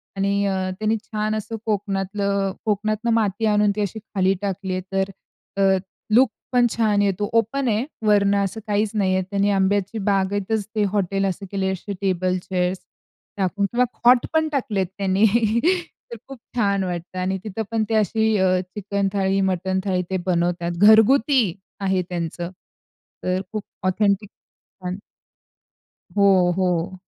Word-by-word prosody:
आणि 200 +1 +1
अ, 195 - +1 0.3
त्यांनी 215 +1 +1
छान 215 0 -2
असं 215 +1 -4
कोकणातलं 200 -1 -1
कोकणातून 215 +2 0
माती 220 0 +1
आणून 210 -1 +3
ती 210 - -1
अशी 205 +2 -3
खाली 195 -3 0
टाकली 195 -1 -3
आहे. 185 - -2
तर 195 0 +1 0.5
अ, 190 -1 +4 0.4
लूक 250 +2 +6 0.2
पण 245 -1 +4
छान 215 -3 +2
येतो. 200 0 0
ओपन 230 +4 +1
आहे 225 +2 +1 0.2
वरनं 200 -1 +4
असं 195 +3 -3
काहीच 210 0 +1
नाही 195 -3 +1
आहे. 190 - +1
त्यांनी 200 0 +1
आंब्याची 200 +2 +1
बागेतच 200 +2 0
ते 210 - +2
हॉटेल 195 -1 0
असं 195 +1 -3
केलं 195 -1 -1
आहे. 190 - +1
अशी 190 +2 -5
टेबल, 185 -1 +1
चेअर्स 180 0 -1 0.6
टाकून 195 +1 0
किंवा 240 +5 +1 0.2
खॉट 245 0 +6
पण 315 0 +2
टाकलेत 215 - -1
त्यांनी. 195 +1 +2 0.9
तर - - -6
खूप 270 - -9 0.2
छान 200 -4 +1
वाटतं 180 0 -5
आणि 190 +1 -1
तिथे 215 0 -4
पण 225 -1 +1
ते 225 - +1
अशी 220 +1 +2
अ, 185 -1 +3 0.2
चिकन 200 -1 -1
थाळी, 195 -1 +1
मटण 190 0 0
थाळी 185 -2 +1
ते 190 - 0
बनवतात. 175 -1 0
घरगुती 220 - +6 0.4
आहे 190 -2 +1
त्यांचं. 170 0 -4 0.7
तर 185 +1 0
खूप 215 -2 -4 0.2
ऑथेंटिक 200 +1 +1 0.5
पण. 180 0 -4 1.2
हो, 190 -3 +5
हो. 180 0 0
200 Hz, 155 wpm, -22 LUFS, 190-215 Hz, 1.2 s, लूक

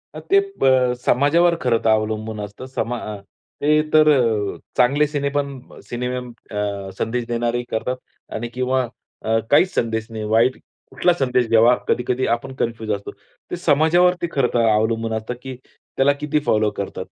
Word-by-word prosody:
अ, - - -5
ते 395 +1 +3 0.2
ब 130 -2 +4
समाजावर 170 +6 +3
खरंतर 115 -3 +1
अवलंबून 110 0 0
असतं. 105 +5 -8
समा 125 -2 -3
अ, 105 -1 -6 0.5
ते 150 +1 +4
तर 155 0 +6
अ, 115 -7 +1 0.2
चांगले 140 +4 +3
सिनेपण 140 -2 -2 0.3
सिनेमे 125 +1 -3 0.2
अ, 100 -1 -3
संदेश 120 +1 -2
देणारे 120 0 -1
करतात 125 +3 -1 0.4
आणि 120 +2 -3
किंवा 130 +1 0 0.4
अ, 110 0 +1
काहीच 180 +6 +4
संदेश 110 -1 -1
नाही, 110 -1 -6
वाईट 115 +4 +2 0.3
कुठला 175 +7 +2
संदेश 125 -5 +1
घ्यावा 115 +2 +5
कधी-कधी 125 +1 0
आपण 125 +3 -2
कन्फ्यूज 115 -2 -2
असतो. 100 0 -3 0.4
ते - - -1
समाजावरती 175 +4 +3
खरंतर 120 -4 +1
अवलंबून 110 +1 +1
असतं, 110 +2 -3
की 130 0 -7 0.4
त्याला 140 +1 +3
किती 150 0 0
फॉलो 110 0 +3
करतात. 100 - -6
125 Hz, 150 wpm, -21 LUFS, 110-140 Hz, 0.5 s, तर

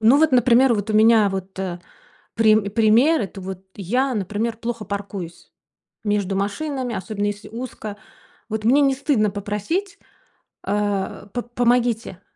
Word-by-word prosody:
Ну, 235 +6 +6
вот, 315 -2 +3
например, 250 0 +5
вот, 210 +1 -3
у - - 0
меня, 220 -1 +6
вот, 190 0 -6
э, 180 -2 -4 0.5
прим 215 -2 +3
пример 230 +9 +4
это, 195 0 -6
вот, 190 0 -7
я, 250 +7 0
например, 215 +3 -2
плохо 230 -1 -4
паркуюсь 200 -4 -6 0.5
между 205 -2 0
машинами, 245 +5 -2
особенно 205 +1 -3
если 205 +1 -5
узко. 225 -3 -7 0.5
Вот 220 0 -3
мне 275 +5 +5
не 275 -1 +3
стыдно 260 -6 +1
попросить, 210 - -3 0.6
а: 205 0 -2
"П-помогите, 240 -4 0
215 Hz, 135 wpm, -22 LUFS, 200-245 Hz, 0.6 s, Ну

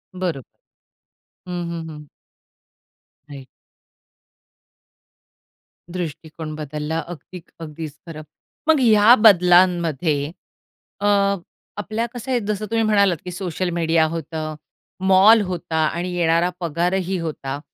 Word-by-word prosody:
बरोबर. 175 -7 -2 1.0
हं, 175 -1 -4
हं, 165 -1 -6
हं. 150 -1 -10 1.2
राइट 135 -2 -10 2.5
दृष्टिकोन 160 -2 -6
बदलला 150 +1 -4
अगदी, 175 +1 -9 0.2
अगदीच 155 -2 -7
खरं. 155 -2 -8 0.5
मग 315 -3 +5
या 220 -1 +6
बदलांमध्ये 175 - +4 0.7
अ, 205 - -1 0.7
आपल्या 215 +3 -2
कसं 250 +2 -6
आहे, 245 - +2
जसं 210 -1 -3
तुम्ही 225 0 +2
म्हणालात 200 -5 +3
की 180 - -5
सोशल 180 0 -3
मीडिया 165 -1 +2
होतं, 155 -1 -5 0.5
मॉल 200 +4 +7
होता 175 -2 -4
आणि 175 +3 -3
येणारा 170 0 +2
पगारही 180 +3 -1
होता. 145 -4 -5
170 Hz, 100 wpm, -21 LUFS, 160-190 Hz, 2.5 s, मॉल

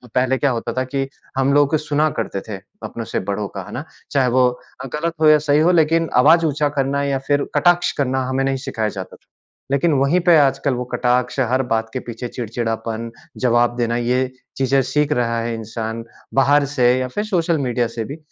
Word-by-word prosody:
पहले 130 +1 +2
क्या 140 -1 +1
होता 115 -1 -3
था 130 - +2
कि 135 -1 0 0.3
हम 135 +1 +2
लोग 145 +1 +4
सुना 150 +1 0
करते 95 - -4
थे 100 - -4 0.3
अपनों 115 -1 -5
से - - -2
बड़ों 100 0 -2
का, 95 - -7
है - - -11
ना? 140 +5 -5 0.3
चाहे 135 -3 +2
वो 125 0 +4 0.5
गलत 165 +2 -2
हो 155 - +5
या 155 - +7
सही 145 +1 +5
हो, 170 +3 +4
लेकिन 165 0 +2
आवाज़ 165 +2 +5
ऊँचा 145 -1 +1
करना 140 +1 0
या 140 -1 0
फिर 145 0 +2
कटाक्ष 175 0 +3
करना 130 0 0
हमें 135 +1 0
नहीं 135 0 0
सिखाया 110 -2 -1
जाता 95 -2 -8
था। - - -26 0.4
लेकिन 145 +3 +2
वहीं 145 +7 +3
पे 170 - +7
आजकल 140 -1 +2
वो 125 - -3
कटाक्ष, 125 +2 +1
हर 130 +1 +2
बात 115 -1 -1
के 130 - -2
पीछे 120 +1 -5
चिड़चिड़ापन, 115 -1 -4 0.3
जवाब 120 -1 +2
देना, 120 -1 0
ये 125 +2 0 0.3
चीज़ें 135 0 +2
सीख 150 +3 0
रहा 115 -2 0
है 115 0 -2
इंसान 115 0 -5 0.3
बाहर 140 +2 +4
से 125 - +1 0.2
या 130 - -1
फिर 205 +11 -3
सोशल 170 -5 +1
मीडिया 120 -1 0
से 115 - -2
भी। 145 +3 -7
130 Hz, 205 wpm, -20 LUFS, 120-145 Hz, 0.5 s, या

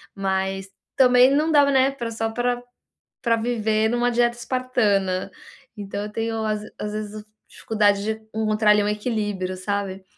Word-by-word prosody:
mas 195 0 -2 0.3
também 250 0 +6
não 310 +2 +2
dá, 290 -2 +6
né, 265 0 +4
pra 235 -4 -5
só 225 0 -3 1.1
viver 220 -2 +1
numa 240 +1 +1
dieta 240 0 +2
espartana, 215 -7 0 0.5
então 200 0 -5
eu 210 - -6
tenho 225 0 -2
às 215 -1 -1 0.2
às 210 0 -4
vezes 215 0 -6 0.2
dificuldade 205 -2 +1
de 220 - 0 0.2
encontrar 215 -1 +2
ali 210 0 +4
um - - -1
equilíbrio, 210 -4 -2
sabe? 195 0 -3
215 Hz, 140 wpm, -23 LUFS, 205-240 Hz, 1.1 s, também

